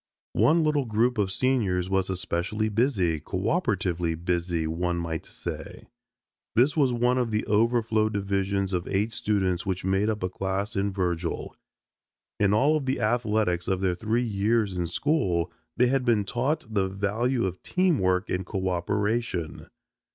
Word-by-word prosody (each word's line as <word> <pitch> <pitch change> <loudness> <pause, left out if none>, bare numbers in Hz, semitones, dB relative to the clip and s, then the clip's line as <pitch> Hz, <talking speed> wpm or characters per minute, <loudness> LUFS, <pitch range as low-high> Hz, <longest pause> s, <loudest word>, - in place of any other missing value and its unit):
One 165 +2 +4
little 150 -3 +1
group 115 +1 +1
of 95 -2 +1
seniors 100 -7 +1
was 95 0 0
especially 95 +4 -1
busy, 105 - +1
cooperatively 95 - -1
busy 85 0 -1
one 85 +2 -1
might 85 -2 -4
say. - - -7 0.7
This 130 +5 +4
was 140 -5 +3
one 125 +1 +2
of 120 -2 0
the 110 0 -1
overflow 110 0 +2
divisions 100 -1 -1
of 90 -1 -1
eight 105 +4 0
students 95 -5 0
which 95 -1 -3
made 95 +3 +2
up 105 -3 -2
a 90 - 0
class 95 +2 -3
in 100 +1 0
Virgil. 90 -3 -2 0.8
In 100 -1 +3
all 140 +9 +4
of 145 -3 -2
the 130 - 0
athletics 110 -6 +1
of 95 -1 +1
their 95 -1 +1
three 110 +6 0
years 105 -1 +1
in 90 -1 -1
school 90 - 0 0.3
they 125 - +5
had 130 +1 +1
been 115 -4 +3
taught 130 +9 -1
the 100 -2 +2
value 105 +5 0
of 95 -1 -4
team 180 -5 +1
work 95 +2 +1
and 90 +1 -1
coöperation. 95 0 -2
100 Hz, 155 wpm, -26 LUFS, 90-115 Hz, 0.8 s, they